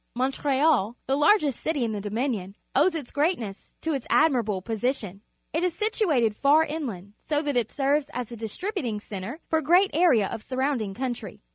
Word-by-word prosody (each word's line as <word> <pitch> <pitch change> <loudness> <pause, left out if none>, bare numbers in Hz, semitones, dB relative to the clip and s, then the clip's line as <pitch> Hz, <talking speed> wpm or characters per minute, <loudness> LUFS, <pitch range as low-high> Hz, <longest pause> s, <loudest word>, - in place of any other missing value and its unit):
Montreal, 265 -2 +1
the 265 - +1
largest 295 - +3
city 305 -5 -1
in 230 - -1
the 210 -2 -3
Dominion, 210 -2 -2 0.2
owes 325 +5 +4
its 290 -7 -5
great 315 +5 +2
ness 200 -4 -9
to 320 - -1
its 270 -4 -4
admiral:)lo 240 -11 +3
position. 220 -1 -3 0.3
It 325 +3 0
is 360 -2 0
situated 340 - +1
far 290 +6 +5
inland, 235 - -5
so 300 0 -1
that 290 -2 -1
it 235 -3 0
ser 280 +1 +2
ves 285 - -13
as 245 -2 -5
a - - -6
distributing 235 - -3
cen 200 -2 -7
tre 235 +10 -6
foFa 320 -1 +2
gre 330 +5 +4
at 390 - -3
area 305 - +4
of 210 - -5
surround 260 +1 -1
ing 195 -2 -4
coimtry 230 -5 -5
265 Hz, 200 wpm, -26 LUFS, 220-305 Hz, 0.3 s, far